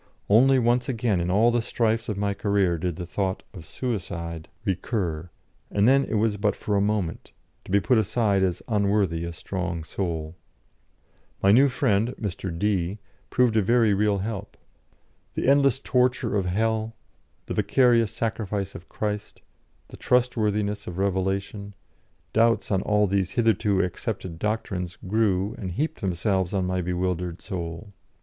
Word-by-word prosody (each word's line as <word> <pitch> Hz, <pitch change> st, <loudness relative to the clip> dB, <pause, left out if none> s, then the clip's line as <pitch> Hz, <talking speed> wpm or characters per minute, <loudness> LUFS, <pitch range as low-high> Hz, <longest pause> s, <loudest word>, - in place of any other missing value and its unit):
Only 130 Hz, +5 st, +6 dB
once 120 Hz, +1 st, +2 dB
again 115 Hz, -7 st, 0 dB
in 85 Hz, -, -1 dB
all 110 Hz, +6 st, +4 dB
the 120 Hz, 0 st, +1 dB
strifes 115 Hz, 0 st, 0 dB
of 105 Hz, -, -2 dB
my 100 Hz, 0 st, 0 dB
career 100 Hz, -4 st, +1 dB
did 90 Hz, -1 st, -2 dB
the 90 Hz, -, -5 dB
thought 95 Hz, +1 st, -2 dB
of 90 Hz, -, -9 dB
suicide 85 Hz, -10 st, -4 dB, 0.2 s
recur, 90 Hz, -4 st, -2 dB, 0.4 s
and 100 Hz, +2 st, +2 dB
then 135 Hz, +1 st, +5 dB
it -, -, -3 dB
was 105 Hz, -1 st, +1 dB
but 105 Hz, -1 st, +1 dB
for 105 Hz, -, -2 dB
a 100 Hz, -, +3 dB
moment, 100 Hz, -5 st, -1 dB, 0.3 s
to -, -, -9 dB
be 100 Hz, -, +5 dB
put 115 Hz, +4 st, +3 dB
aside 105 Hz, -2 st, +1 dB
as 90 Hz, -2 st, 0 dB
unworthy 100 Hz, -6 st, +1 dB
a 85 Hz, -, -4 dB
strong 90 Hz, -1 st, -4 dB
soul. 80 Hz, -2 st, -4 dB, 1.1 s
My 95 Hz, -, +6 dB
new 135 Hz, +6 st, +6 dB
friend, 120 Hz, -2 st, +1 dB
Mr. 95 Hz, -2 st, -4 dB
D, 95 Hz, -1 st, 0 dB, 0.3 s
proved 125 Hz, -3 st, +2 dB
a 110 Hz, -, +4 dB
very 115 Hz, +1 st, +3 dB
real 105 Hz, 0 st, +2 dB
help. 105 Hz, 0 st, -5 dB, 0.8 s
The -, -, -1 dB
endless 140 Hz, -2 st, +4 dB
torture 125 Hz, -3 st, +1 dB
of 95 Hz, -3 st, 0 dB
hell, 110 Hz, +3 st, 0 dB, 0.5 s
the -, -, -4 dB
vicarious 120 Hz, -4 st, +3 dB
sacrifice 105 Hz, -3 st, -3 dB
of 90 Hz, -, -11 dB
Christ, 105 Hz, -1 st, -4 dB, 0.5 s
the -, -, -11 dB
trustworthiness 105 Hz, -4 st, 0 dB
of 90 Hz, -, -6 dB
revelation, 100 Hz, +1 st, -2 dB, 0.6 s
doubts 115 Hz, 0 st, +3 dB
on 95 Hz, -1 st, +2 dB
all 105 Hz, +1 st, +2 dB
these 95 Hz, -2 st, 0 dB
hitherto 110 Hz, -4 st, +3 dB
accepted 90 Hz, -1 st, -4 dB
doctrines 95 Hz, -4 st, -2 dB
grew 100 Hz, -1 st, +1 dB
and 95 Hz, -, -4 dB
heaped 150 Hz, -, -2 dB
themselves 95 Hz, 0 st, 0 dB
on 95 Hz, -1 st, +1 dB
my 90 Hz, 0 st, -1 dB
bewildered 90 Hz, -1 st, -2 dB
soul. 95 Hz, +1 st, -6 dB
100 Hz, 155 wpm, -25 LUFS, 90-115 Hz, 1.1 s, Only